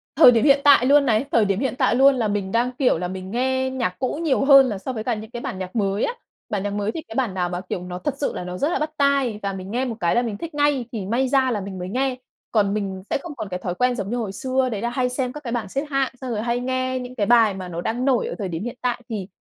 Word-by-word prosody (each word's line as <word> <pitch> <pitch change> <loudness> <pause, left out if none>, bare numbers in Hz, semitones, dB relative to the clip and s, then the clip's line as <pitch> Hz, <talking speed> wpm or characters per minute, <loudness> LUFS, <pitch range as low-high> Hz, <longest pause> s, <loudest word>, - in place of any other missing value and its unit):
thời 270 -4 +9
điểm 230 -2 +2
hiện 280 -1 +5
tại 280 -4 +6
luôn 285 +1 +5
này, 225 +1 +2
thời 225 -3 +4
điểm 195 +1 0
hiện 265 -2 -1
tại 255 -4 +2
luôn 270 +1 +6
là 235 -4 0
mình 205 -2 -2
đang, 240 +3 +1
kiểu, 250 - +2
là 180 +1 -3
mình 190 +1 -7
nghe 260 +2 0
nhạc 240 -9 -2
cũ 260 +4 -2
nhiều 275 -3 +2
hơn 275 -2 +7
là 205 - -3
so 255 +7 -5
với 220 - -4
cả 245 - 0
những 220 +2 -9
cái 240 - -6
bản 190 - -5
nhạc 185 +2 -6
mới 200 -1 0
á. - - 0 0.4
Bản 200 -2 -2
nhạc 205 0 -2
mới 205 +1 -1
thì 320 - -5
cái 220 - -9
bản 240 -7 0
nào 180 -2 -1
mà, 180 0 -4
kiểu, 180 - -3
nó 180 0 -6
thật 290 - -2
sự 285 - -1
là - - -4
nó 180 0 -5
rất 290 - +1
là - - 0
bắt 305 0 -2
tai 275 -6 +2
và 195 - -1
mình 190 +1 -7
nghe 255 +3 0
một 235 -3 -3
cái 170 -1 +1
là 240 - +4
mình 220 -4 -3
thích 330 +7 -7
ngay 290 -4 +2
thì 215 -6 -4
may 240 +6 +1
ra 260 -1 +2
là 210 -4 -1
mình 195 -1 -7
mới 180 - -5
nghe. 260 +4 0 0.4
Còn 205 -3 +2
mình 195 -3 -3
sẽ - - +1
không 295 0 -9
còn 210 -6 -6
cái 180 0 -4
thói 180 -1 -4
quen 250 +4 +1
giống 200 -2 -4
như 245 - -1
hồi 215 -5 -3
xưa 260 +4 0
đấy 205 -1 -3
là 235 - -1
hay 250 +1 0
xem 250 0 -2
các 300 -1 -9
cái 235 - -4
bản 230 -5 -2
xếp 275 +6 -2
hạng, 275 -2 0
xong 255 -2 -4
rồi 215 - -1
hay 235 +1 0
nghe 255 0 -1
những 250 0 -8
cái 210 -5 0
bài 225 -2 +5
mà 185 -1 -6
nó 170 -1 -5
đang 240 +6 -2
nổi 260 -3 +2
ở - - -4
thời 200 -4 -3
điểm 165 +1 -4
hiện 240 +1 -5
tại 245 -1 -1
thì, 205 -5 -4
240 Hz, 320 wpm, -23 LUFS, 200-260 Hz, 0.4 s, thời